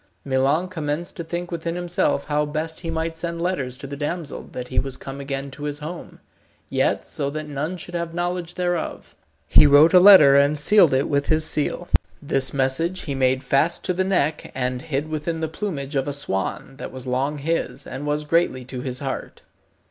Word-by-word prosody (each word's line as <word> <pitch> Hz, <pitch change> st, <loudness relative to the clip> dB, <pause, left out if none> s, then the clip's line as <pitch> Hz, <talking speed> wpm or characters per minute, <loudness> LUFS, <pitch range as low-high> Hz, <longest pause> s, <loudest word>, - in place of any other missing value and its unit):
Milon 140 Hz, +6 st, +2 dB
commenced 160 Hz, -1 st, -4 dB
to 170 Hz, -, -4 dB
think 175 Hz, +2 st, -5 dB
within 170 Hz, 0 st, -3 dB
himself 175 Hz, -5 st, 0 dB
how 150 Hz, 0 st, +1 dB
best 155 Hz, +2 st, -3 dB
he 165 Hz, -, -5 dB
might 165 Hz, 0 st, -2 dB
send 170 Hz, 0 st, -4 dB
letters 155 Hz, -8 st, -2 dB
to 140 Hz, -, -8 dB
the 140 Hz, +1 st, -6 dB
damsel 150 Hz, +2 st, -4 dB
that 125 Hz, 0 st, -6 dB
he -, -, +1 dB
was 135 Hz, 0 st, -3 dB
come 135 Hz, 0 st, -8 dB
again 135 Hz, 0 st, -4 dB
to 145 Hz, +3 st, -7 dB
his 145 Hz, -1 st, -3 dB
home, 160 Hz, +4 st, -8 dB, 0.5 s
yet -, -, +1 dB
so 140 Hz, -, -2 dB
that 155 Hz, +1 st, -5 dB
none 150 Hz, +5 st, -3 dB
should 175 Hz, +1 st, -9 dB
have 170 Hz, -1 st, -2 dB
knowledge 175 Hz, 0 st, -3 dB
thereof. 175 Hz, -2 st, -3 dB, 0.3 s
He 150 Hz, -, +7 dB
wrote 145 Hz, +4 st, +7 dB
a 180 Hz, -, +9 dB
letter, 180 Hz, -8 st, +9 dB
and 140 Hz, +2 st, +4 dB
sealed 170 Hz, -1 st, +5 dB
it 135 Hz, -, +1 dB
with 140 Hz, 0 st, 0 dB
his 155 Hz, 0 st, +2 dB
seal. 155 Hz, +4 st, -1 dB, 0.3 s
This 135 Hz, -3 st, +1 dB
message 140 Hz, +7 st, 0 dB
he 140 Hz, -, -4 dB
made 130 Hz, 0 st, +1 dB
fast 140 Hz, +6 st, +1 dB
to 180 Hz, -, 0 dB
the 185 Hz, +2 st, 0 dB
neck, 160 Hz, -6 st, 0 dB
and 125 Hz, -1 st, -1 dB
hid 145 Hz, +1 st, -2 dB
within 155 Hz, +1 st, -3 dB
the 160 Hz, -, -1 dB
plumage 155 Hz, -5 st, -4 dB
of 135 Hz, +1 st, 0 dB
a 145 Hz, -, -2 dB
swan 135 Hz, 0 st, -3 dB
that -, -, -7 dB
was 130 Hz, -1 st, -8 dB
long 135 Hz, +4 st, -1 dB
his, 165 Hz, +4 st, -2 dB
and 135 Hz, +3 st, -6 dB
was 150 Hz, +1 st, 0 dB
greatly 150 Hz, -5 st, +1 dB
to 125 Hz, 0 st, -6 dB
his 130 Hz, 0 st, -3 dB
heart. 135 Hz, -1 st, -5 dB
150 Hz, 200 wpm, -23 LUFS, 135-170 Hz, 0.5 s, a